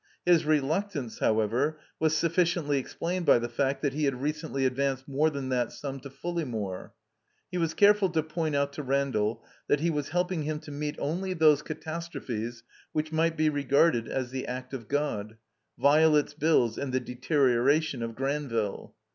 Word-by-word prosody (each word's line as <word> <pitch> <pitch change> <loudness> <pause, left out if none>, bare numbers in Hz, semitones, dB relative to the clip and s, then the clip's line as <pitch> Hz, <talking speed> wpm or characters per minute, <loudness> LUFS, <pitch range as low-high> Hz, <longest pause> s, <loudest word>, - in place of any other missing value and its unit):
His 175 -3 +4
reluctance, 155 - 0
however, 115 +8 +1 0.2
was 155 0 +2
sufficiently 170 -3 +1
explained 170 +6 -3
by - - +7
the 120 0 -2
fact 135 +4 -1
that 140 -2 +1
he 150 +1 0
had 135 -3 0
recent 150 +3 -3
ly 135 - -1
advanced 135 0 0
more 145 +3 +2
than 140 -3 -4
that 125 -2 0
sum 135 +2 -6
to 140 +1 -9
Fulleymore. 135 - -4 0.6
He 180 - -2
was 165 -1 0
careful 205 -1 +5
to 160 -2 0
point 160 -1 -2
out 140 0 0
to 150 - -5
Randall 130 -5 0 0.2
that 145 - +3
he 165 +3 +1
was 145 -2 -2
helping 180 0 0
him 150 +1 -2
to 155 - -10
meet 150 +1 -3
only 185 +5 -2
those 155 -3 +5
catastrophes 150 -8 -5 0.3
which 155 0 -1
might 165 +1 +1
be 155 0 +3
regarded 140 -3 +2
as 130 -2 -3
the 130 0 -4
act 125 +1 -6
of 120 -5 -6
God 115 -7 -2 0.2
— - - -36
^Violet's 150 0 +4
bills 145 -7 +2
and 140 -2 -3
the 130 - +1
deterioration 130 +2 +1
of 115 -1 -4
Granville. 135 -6 -2
145 Hz, 175 wpm, -28 LUFS, 130-160 Hz, 0.6 s, by